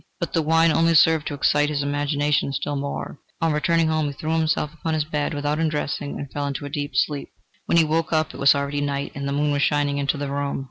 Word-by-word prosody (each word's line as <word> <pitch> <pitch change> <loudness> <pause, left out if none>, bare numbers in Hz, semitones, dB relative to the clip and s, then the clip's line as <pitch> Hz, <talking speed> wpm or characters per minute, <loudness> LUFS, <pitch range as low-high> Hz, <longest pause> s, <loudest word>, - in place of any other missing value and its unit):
But 170 - -4
the 165 - +2
wine 165 +1 +3
only 165 +1 +3
served 160 0 +4
to 145 - -3
excite 145 +1 +2
his 145 -1 -1
imagination 145 0 0
still 145 +2 -2
more. 140 +1 -5 0.2
On 165 -1 +1
returning 165 +2 +2
home, 155 -1 +1
he 145 - -4
threw 155 +3 -4
himself 155 -1 0
upon 160 0 -3
his 155 - +1
bed 150 -2 -2
without 145 +1 -1
undressing, 150 -2 -2
and 140 -2 -7
fell 145 -1 -3
into 140 +1 -4
a - - -5
deep 145 -2 -4
sleep. 145 +2 0 0.4
When - - +3
he 165 - +6
woke 160 +1 0
up 155 -1 +1
it - - -10
was 140 0 +6
already 140 +1 -2
night, 140 -1 -2
and 140 0 -4
the - - -2
moon 145 +1 +1
was 145 0 0
shining 145 -1 +1
into 140 +1 0
the 140 -1 -4
room. 140 0 -2
145 Hz, 245 wpm, -23 LUFS, 140-155 Hz, 0.4 s, he